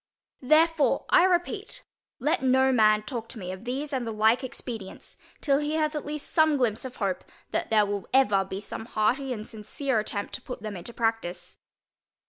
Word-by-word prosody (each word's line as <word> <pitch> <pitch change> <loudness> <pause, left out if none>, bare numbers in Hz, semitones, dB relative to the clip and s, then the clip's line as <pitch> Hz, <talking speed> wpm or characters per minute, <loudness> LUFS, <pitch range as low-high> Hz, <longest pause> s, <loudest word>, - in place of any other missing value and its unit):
Therefore 310 +2 +3
I 355 - +7
repeat, 375 +4 -1 0.3
let 310 +6 0
no 265 0 +4
man 215 -3 +4
talk 230 -1 -5
to - - -9
me 185 -3 -5
of 190 +4 -9
these 280 +4 -3
and 250 -3 -1
the - - -2
like 220 +4 +3
expedients, 230 -5 -7 0.3
till 280 -2 +2
he 300 +1 -1
hath 310 -1 +1
at 300 -2 -4
least 300 0 -6
some 315 -3 +4
glympse 235 -3 0
of 255 - -7
hope, 195 -4 -2 0.3
that - - -1
there 215 -2 +4
will 200 -1 -4
ever 205 -7 +4
be 190 0 -6
some 220 +2 -6
hearty 250 +5 0
and 215 -3 -4
sincere 225 +4 -2
attempt 205 -1 -4
to - - -4
put 250 -5 -8
them 215 -2 -5
into 180 +6 -7
practice. 225 -6 -3
245 Hz, 190 wpm, -27 LUFS, 215-285 Hz, 0.3 s, I